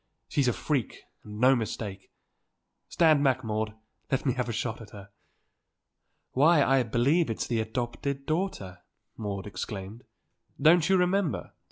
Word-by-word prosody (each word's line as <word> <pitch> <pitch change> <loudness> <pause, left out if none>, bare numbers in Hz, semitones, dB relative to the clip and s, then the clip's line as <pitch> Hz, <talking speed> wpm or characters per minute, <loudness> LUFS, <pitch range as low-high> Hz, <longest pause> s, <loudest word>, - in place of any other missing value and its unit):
She's 140 -3 +1
a 125 - +3
freak 125 +3 -2 0.2
and 105 0 -9
no 130 +3 +6
mistake! 105 -4 -5 0.8
Stand 155 -4 +4
back, 130 -2 +2
Maude, 110 0 -1
and - - -28 0.3
let 135 - 0
me 130 - +2
have 125 -1 -2
a - - 0
shot 115 0 -3
at 110 - -11
her." 100 -1 -12 1.2
"Why, 150 +3 +5
I 135 -1 +3
believe 130 +8 +2
it's 115 - -2
the 120 -2 -1
adopted 120 +5 -3
daughter!" 155 - -3 0.4
Maude 100 -3 -4
exclaimed. 105 +2 -6 0.6
"Don't 165 +2 +5
you 190 - +5
remember. 180 -2 0
125 Hz, 150 wpm, -28 LUFS, 110-145 Hz, 1.2 s, no